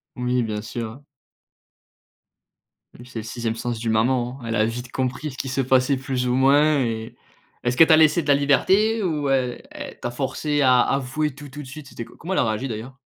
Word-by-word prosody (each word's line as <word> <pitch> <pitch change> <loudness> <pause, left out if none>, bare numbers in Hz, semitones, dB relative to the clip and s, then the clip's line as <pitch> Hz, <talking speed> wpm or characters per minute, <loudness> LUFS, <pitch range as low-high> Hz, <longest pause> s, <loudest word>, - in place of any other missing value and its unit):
Oui, 125 0 0
bien 105 -1 -3
sûr 115 0 -5
hein. 135 +6 -14 2.0
Oui 120 - -12
c'est 120 - -6
le 110 - -6
6e 115 0 -3
sens 115 0 -3
d'une 115 -1 -1
maman, 125 +3 +1
elle 115 - -2
a 110 0 +3
vite 120 +2 -5
compris 130 +3 -2
ce 130 - -12
qui 135 - -4
se 130 +1 0
passait 130 +1 +2
plus 130 -1 -2
ou 125 - +1
moins 145 +3 +4
et 115 0 -4 0.5
est-ce 120 0 0
qu'elle 160 +5 +7
t'a 160 - +7
laissé 160 +2 +5
de 145 - -9
la 145 - +5
liberté 195 +11 +3
ou 150 -6 -1
e 130 -2 +1
elle - - -9
t'a 120 - -4
forcé 145 +3 -1
à 125 -2 +5
avouer 140 +2 -1
tout, 145 +2 -11
tout 145 +2 -8
de 130 - -12
suite? 140 +1 -10
C'était 115 - -7
co - - -17
comment 180 +4 -4
elle - - +1
a - - +4
réagi 110 +4 -1
d'ailleurs? 120 +3 -6
130 Hz, 220 wpm, -23 LUFS, 120-145 Hz, 2.0 s, qu'elle